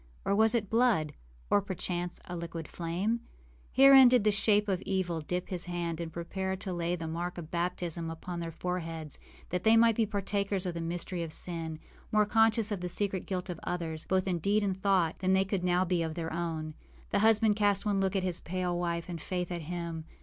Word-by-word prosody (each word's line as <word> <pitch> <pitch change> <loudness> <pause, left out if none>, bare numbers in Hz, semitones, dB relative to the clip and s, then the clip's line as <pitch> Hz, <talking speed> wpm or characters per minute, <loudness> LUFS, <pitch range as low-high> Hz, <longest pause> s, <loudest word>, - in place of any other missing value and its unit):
or 195 - +2
was 220 +2 +4
it 215 -4 0
blood? 220 -10 +2 0.4
or, 205 - +5
perchance, 180 -2 -4
a 180 - -6
liquid 165 -1 -5
flame? 180 +7 -1 0.5
Herein 270 -1 +9
did 245 -3 +4
the 210 - +4
shape 210 0 +3
of 190 -2 0
evil 180 -4 -1
dip 180 +4 -3
his 180 -2 -3
hand 170 -2 -3
and 165 -1 -5
prepare 190 +3 -3
to 190 0 -5
lay 175 0 -1
the 165 -2 -5
mark 175 +3 -4
of 165 -2 -8
baptism 170 -1 -2
upon 170 +2 -6
their 165 -1 -4
foreheads, 165 -3 -4 0.3
that 180 0 -2
they 225 +1 +6
might 230 -1 +5
be 225 -1 +2
partakers 200 -1 -1
of 180 - -2
the 170 - -4
mystery 170 +1 -3
of 165 -2 -4
sin, 165 -2 -3 0.3
more 215 0 +4
conscious 225 0 +3
of 200 -3 -2
the 180 - -3
secret 195 0 -1
guilt 185 -2 -2
of 175 -3 -5
others, 165 -3 -3
both 190 0 +1
in 180 -2 0
deed 205 +5 +2
and 190 -1 -2
thought, 190 -5 +2
than 190 0 +2
they 190 0 +3
could 195 -2 -2
now 180 +1 +2
be 180 -1 +1
of 160 -1 -2
their 165 -2 -4
own. 160 -2 -3 0.4
The 200 - +2
husband 220 0 +4
cast 205 -1 +2
one 205 -2 +1
look 190 0 0
at 190 - +1
his 180 -2 -2
pale 180 0 -2
wife, 170 -1 -2
and 170 -3 -6
Faith 180 +1 -3
at 175 -1 -3
him. 165 -1 -5
180 Hz, 215 wpm, -30 LUFS, 170-200 Hz, 0.5 s, Herein